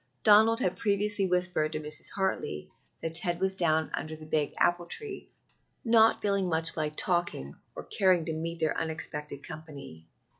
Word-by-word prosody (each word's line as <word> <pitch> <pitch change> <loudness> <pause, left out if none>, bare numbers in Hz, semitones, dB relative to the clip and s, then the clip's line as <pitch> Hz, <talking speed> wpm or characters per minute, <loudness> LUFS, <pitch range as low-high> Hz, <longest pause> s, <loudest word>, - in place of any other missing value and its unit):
Donald 220 +2 +6
had 185 - -1
previously 205 -1 0
whispered 180 -4 0
to 155 - -2
Mrs. 150 0 -4
Hartley 190 - -2 0.3
that 165 - -3
Ted 175 +1 -1
was 190 0 +1
down 160 -4 +1
under 155 0 -3
the 155 0 -11
big 155 -1 0
apple 175 0 +2
tree, 415 - -8 0.6
not 225 -1 +4
feeling 200 -3 +1
much 160 0 +3
like 150 -1 -2
talking 175 - 0 0.2
or - - -6
caring 185 -4 +2
to 160 - -3
meet 165 +1 -4
their 160 -2 0
unexpected 150 -3 -4
company. 140 - -10
165 Hz, 160 wpm, -29 LUFS, 155-190 Hz, 0.6 s, Donald